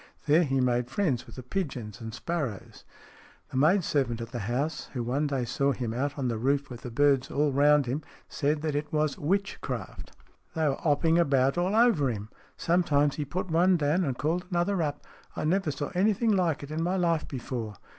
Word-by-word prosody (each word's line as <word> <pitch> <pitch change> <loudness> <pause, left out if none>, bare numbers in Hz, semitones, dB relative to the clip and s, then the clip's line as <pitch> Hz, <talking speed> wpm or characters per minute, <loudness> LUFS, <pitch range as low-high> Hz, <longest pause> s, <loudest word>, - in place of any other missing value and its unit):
There 155 +3 +5
he 135 -3 0
made 125 -1 +1
friends 135 - -1
with - - -12
the 130 - -8
pigeons 125 - -4
and 115 0 -6
sparrows. 125 - -4 0.7
The 130 - -3
maid 170 +8 +4
servant 130 -7 0
at 115 0 -6
the 120 - -4
house, 135 +9 -2
who 125 -3 -2
one 135 +6 0
day 135 -3 -1
saw 140 +3 +1
him 120 -4 -3
out 140 +4 -2
on 135 -3 -1
the 115 -2 -2
roof 140 +3 0
with 120 - -8
the 125 - -6
birds 135 +2 +2
all 145 0 +1
round 145 +1 +4
him, 130 +5 -2 0.3
said 150 +2 -1
that 155 -2 -1
it 145 +1 -3
was 155 -1 0
witchcraft. 195 +6 -3 0.2
" - - -37
They 160 -1 +1
were 135 - 0
'opping 160 +2 +3
about 135 -4 +3
all 180 +4 0
over 220 - +4
'im. 105 -2 -5 0.3
Some 175 +2 +2
times 145 -3 +2
he 150 - -2
put 175 +5 -4
one 175 +3 +4
down 155 +4 +1
and 135 -6 -2
called 170 +4 -1
another 175 +1 0
up. 145 -2 -3 0.3
I - - -3
never 185 +1 +1
saw 145 0 -3
anything 215 +4 +2
like 175 -7 +1
it 145 - -8
in 155 +1 -2
my 180 +3 0
life 170 -3 +1
before." 120 -5 -5
145 Hz, 210 wpm, -28 LUFS, 130-170 Hz, 0.7 s, There